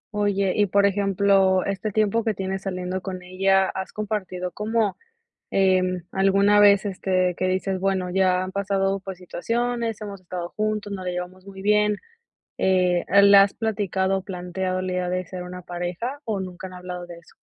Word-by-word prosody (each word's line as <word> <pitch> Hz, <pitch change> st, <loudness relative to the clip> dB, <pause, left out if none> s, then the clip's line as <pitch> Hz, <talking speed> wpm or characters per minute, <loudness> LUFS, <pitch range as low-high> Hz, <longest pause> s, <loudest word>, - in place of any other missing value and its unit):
Oye, 200 Hz, -2 st, +1 dB
y, 205 Hz, -1 st, +3 dB
por 200 Hz, +2 st, +3 dB
ejemplo, 195 Hz, -1 st, +3 dB
este 200 Hz, +2 st, -2 dB
tiempo 215 Hz, +2 st, +1 dB
que 220 Hz, -4 st, 0 dB
tienes 190 Hz, 0 st, -3 dB
saliendo 185 Hz, -1 st, -3 dB
con 185 Hz, -2 st, -6 dB
ella, 190 Hz, +1 st, +2 dB
has 190 Hz, 0 st, -5 dB
compartido, 190 Hz, -4 st, -3 dB
como, 215 Hz, +1 st, 0 dB, 0.6 s
em, 185 Hz, -2 st, +2 dB
alguna 195 Hz, +2 st, +4 dB
vez, 200 Hz, 0 st, +6 dB
este, 185 Hz, -2 st, 0 dB
que 185 Hz, -, -1 dB
dices: 190 Hz, +1 st, -1 dB
"Bueno 190 Hz, -1 st, 0 dB
ya 185 Hz, 0 st, +2 dB
han 185 Hz, -, -4 dB
pasado 195 Hz, 0 st, 0 dB
por 190 Hz, -1 st, -7 dB
situaciones, 230 Hz, +5 st, -2 dB
hemos 200 Hz, -2 st, -7 dB
estado 175 Hz, -1 st, -5 dB
juntos, 215 Hz, -1 st, -1 dB
nos 185 Hz, -, -6 dB
la 180 Hz, -, -1 dB
llevamos 180 Hz, +1 st, -6 dB
muy 195 Hz, -1 st, -10 dB
bien", 210 Hz, +1 st, +2 dB, 0.6 s
eh, 180 Hz, -2 st, +2 dB
¿la 200 Hz, 0 st, +8 dB
has 200 Hz, -, -1 dB
platicado, 195 Hz, -3 st, -1 dB
planteado, 185 Hz, 0 st, -3 dB
el 185 Hz, -, -3 dB
día 180 Hz, -1 st, -1 dB
de 185 Hz, 0 st, -2 dB
ser 180 Hz, +1 st, -7 dB
una 180 Hz, 0 st, -8 dB
pareja, 180 Hz, -, -4 dB
o 215 Hz, -6 st, -2 dB
nunca 185 Hz, 0 st, -6 dB
han 185 Hz, -, -12 dB
hablado 180 Hz, -1 st, -7 dB
de 175 Hz, -1 st, -10 dB
eso? 170 Hz, -, -19 dB
190 Hz, 175 wpm, -24 LUFS, 185-200 Hz, 0.6 s, la